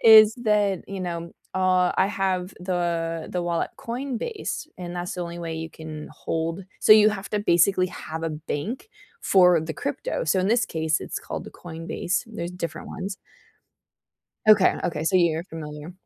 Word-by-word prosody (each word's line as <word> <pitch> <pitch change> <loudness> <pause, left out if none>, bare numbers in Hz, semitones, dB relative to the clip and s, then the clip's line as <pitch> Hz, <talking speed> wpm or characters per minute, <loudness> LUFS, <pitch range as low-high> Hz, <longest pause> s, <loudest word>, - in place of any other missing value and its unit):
is 220 -1 +10
that, 205 -3 +2
you 195 -1 -5
know, 170 -2 -4 0.2
uh, 185 -1 +3
I 190 - +4
have 190 -2 -1
the 170 -3 -1
the 180 -1 -1
wallet 170 -1 -1
Coinbase, 275 - -4
and 175 -1 -6
that's 175 0 -3
the 180 - -3
only 170 0 -6
way 165 -1 -4
you 160 0 -4
can 155 -1 -8
hold 165 +4 -3 0.2
so - - +8
you 215 0 +8
have 200 -1 -5
to, 210 - 0
basically, 185 0 +3
have 160 -2 -6
a 165 - -1
bank 160 - -4 0.3
for 180 -3 +5
the 160 0 -4
crypto, 285 -1 -3
so 185 +4 +2
in 190 - +1
this 235 +1 +3
case, 160 -1 0
it's - - -4
called - - -5
the - - -9
Coinbase, 170 +4 -3
there's 175 -6 -5
different 180 -2 -5
ones. 195 +1 -5 1.3
Okay, 210 -3 +7
okay, 160 -3 -1
so 185 - +1
you're 170 -2 +3
familiar. 155 -1 -8
180 Hz, 170 wpm, -25 LUFS, 165-195 Hz, 1.3 s, is